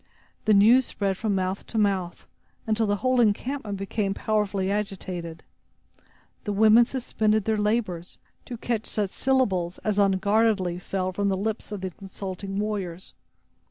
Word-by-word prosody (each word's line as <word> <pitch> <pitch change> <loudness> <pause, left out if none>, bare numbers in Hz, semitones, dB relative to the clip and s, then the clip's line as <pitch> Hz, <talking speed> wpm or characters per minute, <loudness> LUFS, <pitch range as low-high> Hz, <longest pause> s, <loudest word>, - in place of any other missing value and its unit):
The 215 - +5
news 235 +6 +6
spread 195 -2 -1
from 210 +1 -1
mouth 185 +1 -2
to 225 - -5
mouth, 195 -4 0 0.4
until 220 0 +1
the 205 - +2
whole 255 -1 +4
encampment 220 0 0
became 195 0 -2
powerfully 205 -3 0
agitated. 185 -5 -4 1.0
The 205 - -2
women 220 +3 +6
suspended 220 -5 0
their 220 - +1
labors, 210 -5 -1 0.3
to 240 - -6
catch 225 -1 -2
such 205 -3 -2
syllables 195 -10 +1
as 210 -1 0
unguardedly 200 -1 +2
fell 185 0 -2
from 200 +2 0
the 190 - 0
lips 220 +2 -3
of 205 -2 -5
the 190 -1 -3
consulting 195 +1 -7
warriors. 195 -4 -4
205 Hz, 145 wpm, -26 LUFS, 190-220 Hz, 1.0 s, news